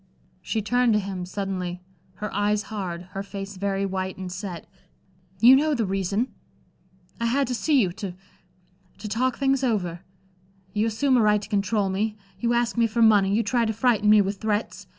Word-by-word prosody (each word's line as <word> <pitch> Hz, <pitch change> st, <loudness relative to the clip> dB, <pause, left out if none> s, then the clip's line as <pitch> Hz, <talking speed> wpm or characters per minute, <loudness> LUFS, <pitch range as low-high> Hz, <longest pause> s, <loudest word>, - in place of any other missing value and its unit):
She 220 Hz, +3 st, -2 dB
turned 245 Hz, +1 st, +2 dB
to 210 Hz, -, +3 dB
him, 190 Hz, -3 st, -5 dB
suddenly, 185 Hz, -2 st, -4 dB, 0.4 s
her 210 Hz, +2 st, -5 dB
eyes 205 Hz, +1 st, +1 dB
hard, 180 Hz, -4 st, -4 dB
her 195 Hz, -, -4 dB
face 195 Hz, 0 st, -7 dB
very 195 Hz, 0 st, -1 dB
white 190 Hz, -1 st, -3 dB
and 185 Hz, -1 st, -6 dB
set. 180 Hz, -2 st, -6 dB, 0.7 s
"You 245 Hz, +5 st, +8 dB
know 300 Hz, +2 st, +2 dB
the 230 Hz, -4 st, 0 dB
reason." 195 Hz, +5 st, -1 dB, 0.9 s
"I 235 Hz, -, 0 dB
had 275 Hz, +4 st, +2 dB
to -, -, -1 dB
see 285 Hz, +4 st, +2 dB
you, 190 Hz, -7 st, +2 dB
to 190 Hz, -1 st, -6 dB, 0.8 s
to 210 Hz, -, -7 dB
talk 245 Hz, +4 st, 0 dB
things 270 Hz, -1 st, +1 dB
over. 185 Hz, -9 st, -1 dB, 0.7 s
You 210 Hz, +2 st, +1 dB
assume 255 Hz, +4 st, +2 dB
a -, -, +4 dB
right 210 Hz, -1 st, +4 dB
to 205 Hz, -, -9 dB
control 205 Hz, -1 st, +1 dB
me, 210 Hz, +3 st, -1 dB, 0.2 s
you 235 Hz, +3 st, +1 dB
ask 240 Hz, 0 st, 0 dB
me 230 Hz, -1 st, +4 dB
for 230 Hz, +1 st, +1 dB
money, 205 Hz, -3 st, +5 dB
you 230 Hz, -, +2 dB
try 235 Hz, +3 st, +1 dB
to 220 Hz, -1 st, 0 dB
frighten 220 Hz, -2 st, +2 dB
me 210 Hz, 0 st, +7 dB
with 195 Hz, +1 st, -3 dB
threats. 215 Hz, 0 st, -2 dB
210 Hz, 190 wpm, -25 LUFS, 195-230 Hz, 0.9 s, You